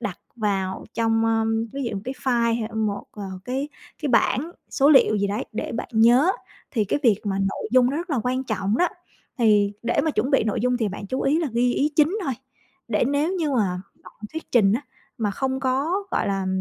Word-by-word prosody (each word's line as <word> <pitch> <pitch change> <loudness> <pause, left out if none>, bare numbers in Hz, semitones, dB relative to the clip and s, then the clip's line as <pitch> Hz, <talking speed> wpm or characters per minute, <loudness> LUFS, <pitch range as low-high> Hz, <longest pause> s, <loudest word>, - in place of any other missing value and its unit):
đặt 205 -6 -4 0.2
vào 195 -4 -1
trong, 225 0 +2
ưm, 225 0 +1
ví 275 0 -4
dụ 230 - -3
một - - -4
cái 260 +2 -4
file 235 -2 +2
hay 220 - -3
một, 215 -2 -1
ờ, 210 - -8 0.2
cái 265 +3 -2 0.3
cái 295 - 0
bảng 270 +4 +2 0.2
số 280 +1 +4
liệu 265 -7 +6
gì 200 - +1
đấy 205 +2 -2
để 215 - -4
bạn 230 - -4
nhớ. 240 +9 +5 0.4
Thì 220 -5 +1
cái 205 - 0
việc 220 -6 +4
mà 195 -2 -1
nội 195 +2 -2
dung 255 0 +5
nó 285 - -2
rất 345 +2 -4
là 275 - +1
quan 255 +1 -1
trọng 210 -1 -1
đó, 355 - +3 0.5
thì 210 -3 +4
để 235 0 +1
mà 315 - +2
chuẩn 270 -2 0
bị 270 -6 +3
nội 215 - -1
dung 250 +1 +1
thì 225 -3 0
bạn 200 +1 -7
chú 260 +6 -2
ý 290 +4 +2
là 330 -3 -1
ghi 245 +1 +2
ý 295 +2 +1
chính 320 +7 +3
thôi, 270 - 0 0.6
để 220 +1 +2
nếu 290 +5 +1
như 325 -5 -1
mà 190 -8 0 0.2
bạn - - -13 0.2
thuyết 320 +1 -7
trình 205 -5 +5
á 235 - +1 0.4
mà 210 -2 0
không 265 +5 -2
có, 280 +9 0
gọi - - 0
là, 195 -1 -1
235 Hz, 230 wpm, -24 LUFS, 210-275 Hz, 0.6 s, liệu